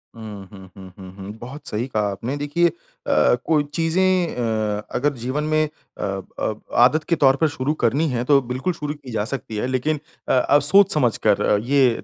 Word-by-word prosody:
हुँ, 105 -3 -9
हुँ, 95 -2 -12
हुँ, 95 -1 -11
हुँ, 95 -2 -10
हुँ, 100 +1 -7
बहुत 130 +6 -9
सही 110 +4 -2
कहा 105 -5 -1
आपने। 115 +7 -4
देखिए 145 +4 +1
अ, - - -1 0.7
कोई 155 -2 +2
चीज़ें 175 +2 +1
अ, 110 -3 -1
अगर 145 +3 +1
जीवन 130 +5 -2
में 155 0 +2 0.3
अ - - -5 0.4
अ, - - 0 0.3
आदत 155 +5 +4
के 170 - +3
तौर 135 -4 +4
पर 160 - +5
शुरू 145 +1 -2
करनी 145 +8 +2
है, 120 -2 -1
तो 140 +2 +4
बिल्कुल 130 +8 -2
शुरू 150 -3 -4
की 145 -4 -12
जा 105 -2 -1
सकती 125 -3 -5
है। 115 - -1
लेकिन 130 +4 -1 0.3
अ, - - +3
अब 140 +3 +4
सोच-समझकर 140 - +3
अ, 105 - +3
ये 130 +4 +3
130 Hz, 195 wpm, -22 LUFS, 110-150 Hz, 0.7 s, पर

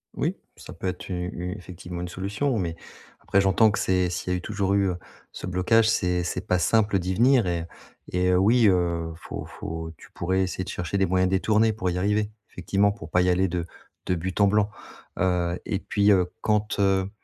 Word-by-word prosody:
Oui, - - -1 0.2
ça - - -11
peut 95 - -5
être 90 +1 -5
u 95 - -2 0.2
u 90 +2 -5
effectivement, 90 -1 -8
une 90 - -4
solution, 105 +9 -2
mais 85 -5 -2 0.4
après, 100 - +2
j'entends 95 +3 +4
que 100 - -2
c'est 90 -1 +1
si 90 +1 -4
il - - +1
y - - +2
a - - 0
eu - - -6
toujours 100 0 -1
eu, 100 -1 +3
heu, 90 - -4 0.3
ce - - -7
blocage, 110 +5 +3
c'est 90 -5 +1
c'est 90 +3 -4
pas 90 - +2
simple 105 +3 +2
d'y 95 +1 -2
venir 120 +2 +4
et 85 -2 -1 0.5
et, 90 0 +2
heu, 90 - +4
oui, 115 +4 +5
heu, 85 -3 +1
faut - - -7
faut 80 0 -6
tu - - -16
pourrais 95 +2 0
essayer 95 0 -3
de 95 - -8
chercher 90 +1 -3
des 95 - +3
moyens 95 0 +2
détournés 110 +4 +2
pour 95 -4 -2
y 90 - -2
arriver, 105 +3 0 0.2
effectivement, 100 +3 +1
pour 100 -6 -9
pas 90 - +3
y 90 - +2
aller 95 +1 +3
de 85 -1 -3 0.4
de 90 - +1
but 90 +3 -4
en 100 - +6
blanc. 105 +1 +2 0.5
Heu, 90 -1 +1
et 100 -4 -1
puis, 100 0 +2
heu, 90 -2 +3
quand, 105 -1 0
heu, 95 -1 +2
95 Hz, 225 wpm, -25 LUFS, 90-100 Hz, 0.5 s, en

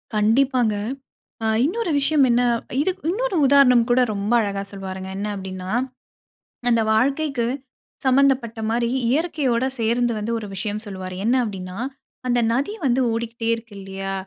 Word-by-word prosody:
கண்டிப்பாங்க. 230 +1 +3 0.7
அ - - 0 0.2
இன்னொரு 395 +4 -1
விஷயம் 285 +1 +4
என்ன 240 +1 +3 0.4
இதுக் 375 +4 -1
இன்னொரு 460 +3 -1
உதாரணம் 260 -4 +6
கூட 245 +1 +4
ரொம்ப 200 +2 -2
அழகா 200 -2 -2
சொல்வாருங்க. 190 -1 -6
என்ன 205 +1 -2
அப்டின்னா 190 -1 -6 1.0
அந்த 230 -1 +3
வாழ்க்கைக்கு 275 +2 +1 0.6
சம்மந்தப்பட்ட 260 -3 +3
மாரி 235 +1 +1 0.2
இயற்கையோட 270 -4 +1
சேர்ந்து 235 +1 +1
வந்து, 215 +2 -3
ஒரு 210 - -7
விஷயம் 210 +2 -3
சொல்லுவாரு. 185 -2 -6
என்ன 235 +4 +3
அப்டின்னா? 185 -4 -6 0.5
"அந்த 245 -1 +2
நதி 275 - 0
வந்து 260 0 +2
ஓடிகிட்டே 230 0 -3
இருக்கு. 230 -1 -12
இல்லையா! 195 0 -5
235 Hz, 135 wpm, -22 LUFS, 205-270 Hz, 1.0 s, உதாரணம்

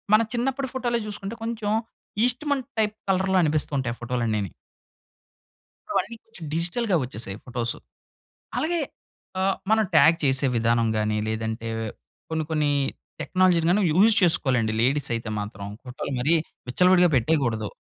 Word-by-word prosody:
మన 215 - +5
చిన్నప్పడు 265 +3 -1
ఫోటోలో 240 -2 0
చూసుకుంటే, 205 +1 -5
కొంచెం 225 -2 -2 0.5
ఈస్ట్‌మన్ 270 +2 0 0.2
టైప్ 215 -1 +1
కలర్‌లో 190 0 +2
అనిపిస్తూ 155 -1 +1
ఉంటాయి 120 -3 -2
ఫోటోలన్నీని. 115 -6 -1 1.4
ఇప్పుడు - - +1
అన్నీ 235 - -9
కొంచెం 225 -7 -10
డిజిటల్‌గా 180 +4 +1
వచ్చేసాయి 110 -5 -5
ఫోటోసు. 120 -2 -3 0.8
అలాగే 340 +2 0 0.6
ఆహ్, 195 0 +1
మనం 220 0 +4
టాగ్ 165 +1 +7
చేసే 135 0 +2
విధానం 115 0 +2
గాని 105 0 0
లేదంటే 110 +1 -3 0.6
కొన్ని 160 -1 -1
కొన్ని 150 -2 +1 0.5
టెక్నాలజీలని 185 0 +3
యూజ్ 205 +7 +5
చేసుకోలండి 125 -10 +2
లేడీస్ 135 +3 +1
అయితే 115 -1 -4
మాత్రం. 105 -1 -6 0.2
ఫోటోలు 130 +2 -6
మరి 145 +7 +2 0.4
విచ్చలవిడిగా 180 +5 +5
పెట్టేయకూడదు. 120 -5 +1
160 Hz, 125 wpm, -25 LUFS, -, 1.4 s, టాగ్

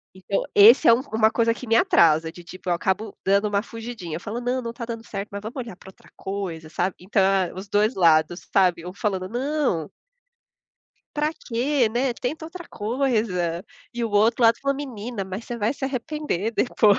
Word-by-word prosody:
Então 190 +1 -2
esse 220 +6 +8
é - - +9
um 235 - +2
uma 220 0 +4
coisa 230 0 +2
que 255 - -8
me 225 - +3
atrasa, 160 -6 +4
de 175 +1 -13
tipo, 185 +1 -8
eu - - +3
acabo 190 +4 -2
dando 200 +2 +3
uma 205 0 0
fugidinha, 225 -9 -7
eu - - -8
falo: 225 +4 -4
"Não, 250 +1 -1
não 230 -1 -4
tá 235 0 -6
dando 230 -1 -6
certo, 200 +1 -5
mas 200 0 -5
vamos 220 +3 -7
olhar 240 -7 -6
pra 190 - -14
outra 190 - -19
coisa, 185 -5 -5
sabe?". 180 +4 -1
Então, 195 +2 0
é 190 -2 +2
os 190 +2 -8
2, 175 -6 +3
sabe, 180 -3 +3
eu 180 +1 -7
falando: 190 -2 -2
"Não" 255 - -1 1.2
"pra 300 +1 +1
quê, 255 -2 0
né, 245 +3 0
tenta 295 +7 -4
outra 345 +2 -9
coisa." 210 -7 -1 0.3
E 240 0 -1
o 225 - -3
outro 220 +4 +3
lado 230 0 +5
fala: 275 0 0
"Menina, 240 -6 -5
mas 190 +4 -6
você 240 - -5
vai 225 +1 0
se 275 - -6
arrepender 265 - -2
depois." 215 -3 +3
215 Hz, 200 wpm, -24 LUFS, 190-240 Hz, 1.2 s, é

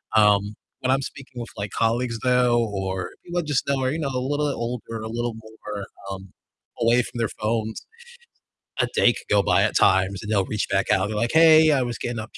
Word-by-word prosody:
um, 105 -1 +4 0.3
when 130 - +1
I'm 135 +1 +2
speaking 135 -3 -9
with, 120 - -7
like, 100 0 -4
colleagues, 115 +1 0
though, 125 -1 +3
or 95 -1 -3
people 175 0 -3
I - - -1
just 145 -3 -1
know 140 -1 +1
are, 130 - +1
you 160 - -3
know, 150 - -1
a 130 - -2
little 145 +3 -1
bit 140 - -2
older, 115 -1 -5
a - - -4
little 120 0 -3
more, 110 -2 -8 0.3
um, 95 0 -8 0.5
away 120 +1 +4
from 120 +1 -8
their 115 - 0
phones, 110 0 -2 1.0
a - - +2
day 120 - +5
could - - -11
go 100 -1 +4
by - - +3
at - - 0
times, 95 +1 +3
and 105 0 -4
they'll 100 -3 +2
reach 105 - -2
back 100 0 0
out 95 - +3
and 100 - -2
be - - -3
like, 115 +3 0
"Hey, 160 -1 +7
I 135 -3 +2
was 120 -2 -3
getting 120 -1 -4
up," 110 0 -6
115 Hz, 235 wpm, -23 LUFS, 105-130 Hz, 1.0 s, Hey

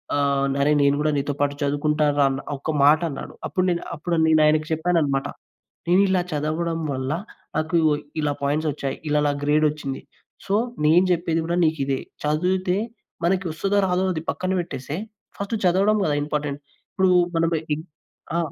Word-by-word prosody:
ఆహ్, 140 -1 +1
అరే 145 +2 +3
నేను 140 0 +4
కూడా 155 - +2
నీతో 140 0 -1
పాటు 145 0 +2
చదువుకుంటానుర" 145 0 +1
అని 135 +1 -3 0.2
ఒక 155 +3 -3
మాటన్నాడు. 155 -1 +1
అప్పుడు 185 -1 0
నే 175 - +2 0.2
అప్పుడు 170 +2 -1
నేను 155 -1 +5
ఆయనకు 155 0 +2
చెప్పానన్నమాట. 160 -4 +1 0.6
నేను 185 +3 +5
ఇలా 185 -1 +2
చదవడం 160 +3 -1
వల్ల 130 +1 -3 0.5
నాకు 160 +2 0 0.5
ఇలా 145 -1 +1
పాయింట్స్ 150 +3 0
ఒచ్చాయి. 140 -1 -4
ఇలా 150 0 +3
నాకు 145 0 -2
గ్రేడొచ్చింది. 150 -2 0 0.4
సో 195 - 0 0.3
నేను 170 +4 +5
చెప్పేది 165 -1 0
గూడా 170 +1 -1
నీకిదే. 140 -4 -1 0.2
చదువుతే 180 +5 +1 0.5
మనకి 185 +1 +1
వస్తాదో 195 +5 0
రాదో 185 +1 +1
అది 160 - -3
పక్కన 185 0 -2
పెట్టేస్తే, 140 -2 -5 0.4
ఫస్ట్ 200 +3 -4
చదవడం 195 +4 +3
కదా! 150 - +1
ఇంపార్టెంట్. 145 -1 -3 0.3
ఇప్పుడు 190 0 +2 0.3
మనం 165 0 +2 0.2
ఇ - - -5 0.6
ఆ! - - +2
155 Hz, 150 wpm, -23 LUFS, 145-175 Hz, 0.6 s, నేను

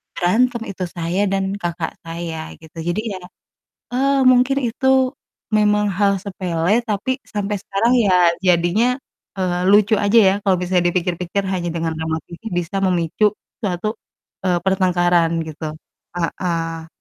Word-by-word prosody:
berantem 235 +7 +2
itu 190 -1 -5
saya 170 +3 -1
dan 195 0 -1
kakak 170 -1 -3
saya 165 -1 -5
gitu. 160 +1 -16
Jadi 175 +5 0 0.2
ya, - - -10 0.7
eee, 275 +2 +2
mungkin 255 +2 +3
itu 260 +3 -2 0.6
memang 210 -1 +3
hal 200 -1 +3
sepele, 185 +1 0
tapi 210 +4 -1 0.2
sampai 205 0 -2
sekarang 200 +5 0
ya 180 -3 +5 0.2
jadinya, 175 +6 +3 0.5
eee, 180 -1 0
lucu 205 +2 +5
aja 205 +3 +4
ya - - +2
kalau 195 -2 +3
bisa 180 0 +2
dipikir-pikir 180 +2 -1
hanya 175 -2 -2
dengan 165 -1 -1
remote 160 0 -2
TV 170 - -11 0.2
bisa 195 +4 -3
memicu 175 +2 +1 0.4
suatu, 190 0 -2 0.6
eee, 180 -1 +3
pertengkaran 175 -3 +2 0.2
gitu. 155 0 -7 0.5
Heeh. 165 -1 -2
185 Hz, 135 wpm, -20 LUFS, 170-205 Hz, 0.7 s, ya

